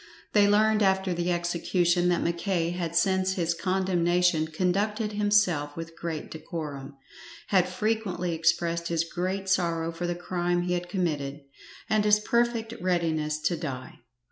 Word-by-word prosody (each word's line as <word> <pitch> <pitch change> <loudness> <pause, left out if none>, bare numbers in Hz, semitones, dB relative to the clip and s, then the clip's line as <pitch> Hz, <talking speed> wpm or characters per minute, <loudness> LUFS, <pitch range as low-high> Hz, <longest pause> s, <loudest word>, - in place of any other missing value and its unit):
They 205 -1 +5
learned 215 +1 +3
after 190 -2 +2
the 175 +1 -1
execution 175 +1 +1
that 175 - +1
Mackay 170 0 0
had 170 -2 -3
since 190 +2 +2
his 170 -2 0
condemnation 180 -2 +1
conducted 200 +6 0
himself 205 -8 +1
with 165 0 -7
great 165 -2 -5
decorum, 150 -4 -6 0.5
had 185 -2 +3
frequently 185 -3 -1
expressed 165 +1 +1
his 165 -1 +1
great 185 +3 -3
sorrow 170 -3 +1
for 170 +1 -4
the 175 - -1
crime 175 0 -1
he 180 0 -1
had 175 0 -3
committed, 150 -6 -2 0.5
and 215 -1 +2
his 210 0 +5
perfect 235 0 0
readiness 160 -4 0
to 165 +3 +1
die. 135 -5 -6
175 Hz, 145 wpm, -27 LUFS, 165-190 Hz, 0.5 s, They